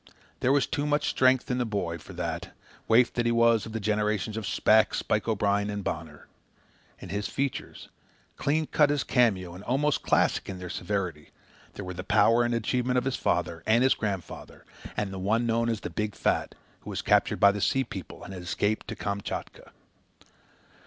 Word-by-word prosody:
There 130 - +2
was 140 0 +3
too 145 -2 -2
much 145 0 +1
strength 130 +1 +3
in 125 - 0
the - - +2
boy 95 -7 -3
for - - -12
that, - - -5 0.3
waif 120 +2 +4
that 120 -1 0
he - - +3
was 115 -1 +3
of - - -8
the 115 - -3
generations 105 -1 0
of 110 -2 -4
Shpack, - - +3
Spike - - -1
O'Brien, 105 -1 +1
and 105 -1 -4
Bonner. 75 -3 -5 0.7
In - - -10
his 100 +2 -2
features, 140 -2 -4 0.5
clean 155 +2 0
cut 150 -1 +3
as 145 -1 +1
a - - -22
cameo 100 -9 +2
and 90 +3 -10
almost 140 +5 +1
classic - - +1
in 95 - -5
their 90 -1 -7
severity, 90 -5 -3 0.4
there 100 - -7
were 90 - -5
the 90 +1 -6
power 115 +4 +4
and 120 0 0
achievement 125 +3 0
of 125 - +1
his 135 -1 0
father, 85 -1 -1
and 115 +3 +4
his 130 - +5
grandfather, 100 -5 -5 0.3
and 105 -2 -2
the 95 - -5
one 110 +5 +1
known 115 0 +1
as 110 -3 -2
the - - -5
Big 105 -1 -3
Fat, - - 0 0.2
who - - -11
was - - -4
captured - - +2
by 100 - +7
the 100 0 -4
Sea 135 +6 +2
people 95 -7 -9
and 95 - -8
escaped 95 +4 -2
to 110 - -5
Kamchatka. 100 -1 -5
110 Hz, 195 wpm, -27 LUFS, 100-125 Hz, 0.7 s, by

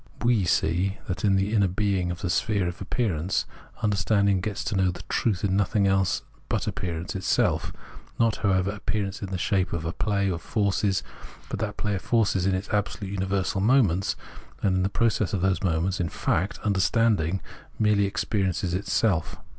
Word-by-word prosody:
We 120 -5 +3
see 90 +4 +1
that 90 - -3
in 100 -2 +4
the 95 +3 +1
inner 100 -3 +4
being 95 -1 0
of 85 +2 -4
the 90 -4 -1
sphere 100 0 +1
of 85 +1 -6
appearance, 95 -5 -1 0.4
understanding 100 -2 +2
gets 100 +1 -3
to - - -2
know 95 -1 +3
in 90 - 0 0.2
truth 105 -6 0
nothing 100 +1 +2
else 95 -2 +2 0.3
but - - 0
appearance 85 0 -4
itself, 95 - +1 0.5
not, 115 -2 +3
however, 95 -1 +1
appearance 100 -1 -3
in 100 - -4
the 95 - -2
shape 95 -1 0
of 85 -1 -3
a 80 - -2
play 100 -2 0
of 90 -3 -2
forces, 100 -1 0 0.5
but - - -4
that - - -3
play 105 - -1
of 95 - -2
forces 100 -5 +2
in 95 - +2
its 95 +2 -4
absolutely 100 -1 -2
universal 95 0 -1
moments 100 -6 +3 0.5
and 95 -2 +2
in - - +2
the 95 - +1
process 110 -2 +1
of 95 - 0
those 95 -2 +1
moments; 90 +1 0
in 85 -2 0
fact, 90 +4 -1
understanding 100 -3 +2 0.4
merely 105 -2 +3
experiences 95 -3 -1
itself. 95 -2 0
95 Hz, 175 wpm, -26 LUFS, 90-105 Hz, 0.5 s, in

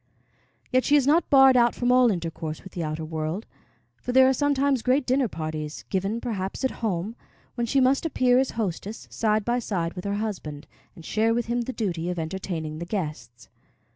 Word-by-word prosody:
Yet 255 0 +3
she 290 - +3
is 285 -3 +4
not 315 +5 +3
barred 270 -2 +7
out 240 -1 +4
from 245 0 +1
all 250 -1 +6
intercourse 165 -4 -4
with 190 - -12
the 170 - -3
outer 155 +1 -3
world, 160 +6 -3 0.5
for 250 - -4
there 260 +1 +6
are 265 - +4
sometimes 280 -1 +1
great 260 +3 +2
dinner 260 0 +2
parties, 155 -3 -5
given 195 +4 -1
perhaps 200 -2 -4
at 260 - +1
home, 210 0 -2 0.4
when 240 -1 -2
she 275 +4 +2
must 265 +1 +3
appear 255 -6 +3
as 265 - +1
hostess, 210 0 -3
side 215 -2 +1
by 240 +1 +1
side 175 -7 -2
with 180 - -7
her 200 0 -1
husband, 185 -9 -4 0.3
and 165 -4 -13
share 225 +1 +1
with 240 -1 0
him 240 +1 -1
the 240 - -3
duty 175 -7 -2
of 180 - -3
entertaining 160 -2 -4
the 170 - -4
guests. 150 - -5
215 Hz, 200 wpm, -25 LUFS, 170-250 Hz, 0.5 s, barred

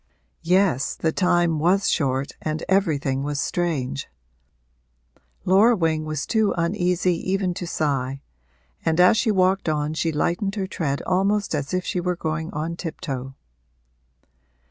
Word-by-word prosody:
Yes, 180 -6 +2
the 160 - 0
time 175 -3 +2
was 185 +5 +2
short 135 -3 0
and 155 0 -3
everything 150 -9 +1
was 145 0 -2
strange. 150 - -2 1.4
Laura 205 +6 +5
Wing 160 -4 0
was 155 -2 -3
too 220 -3 +1
uneasy 180 +1 +1 0.2
even 190 -2 0
to 175 0 -5
sigh, 135 -4 -2 0.6
and 160 +1 +1
as 180 +4 +7
she 220 +1 +1
walked 190 -3 +2
on 150 0 -1
she 160 +1 0
lightened 175 +6 -1
her 195 -3 -1
tread 155 -7 -2
almost 195 +2 +1
as 145 -2 -2
if 185 -1 -1
she 180 - -1
were 180 0 -1
going 160 0 -3
on 160 +3 -4
tiptoe. 135 -6 -5
170 Hz, 140 wpm, -23 LUFS, 150-185 Hz, 1.4 s, as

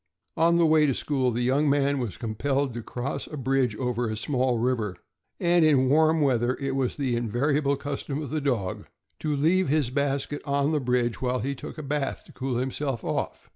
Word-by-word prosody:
On 170 +1 +4
the 170 - +4
way 155 -1 +5
to 135 - +1
school, 135 -4 0
the 120 +1 -1
young 140 +4 +2
man 140 0 +2
was 115 -8 -4
compelled 135 +4 -1
to 120 - -5
cross 125 +4 -4
a 150 - -7
bridge 130 -3 +1
over 120 0 -1
a 110 - -3
small 125 +1 0
river, 115 -5 0 0.4
and 175 -1 +3
in 135 -4 +4
warm 160 +2 +4
weather 125 -3 +2
it 135 -1 -2
was 130 -2 -1
the 130 -4 0
invariable 140 +5 +1
custom 140 0 -4
of 150 -4 -5
the 155 -1 -1
dog 120 -10 -2 0.3
to 150 -2 -1
leave 165 +4 +2
his 145 -4 +1
basket 140 +1 -1
on 140 +1 +1
the 155 - +1
bridge 125 -2 0
while 125 -1 0
he 140 +4 -2
took 135 - -9
a 155 - -6
bath, 140 -1 -2
to - - -16
cool 130 -2 -3
himself 130 0 -2
off. - - -3
135 Hz, 205 wpm, -26 LUFS, 125-145 Hz, 0.4 s, way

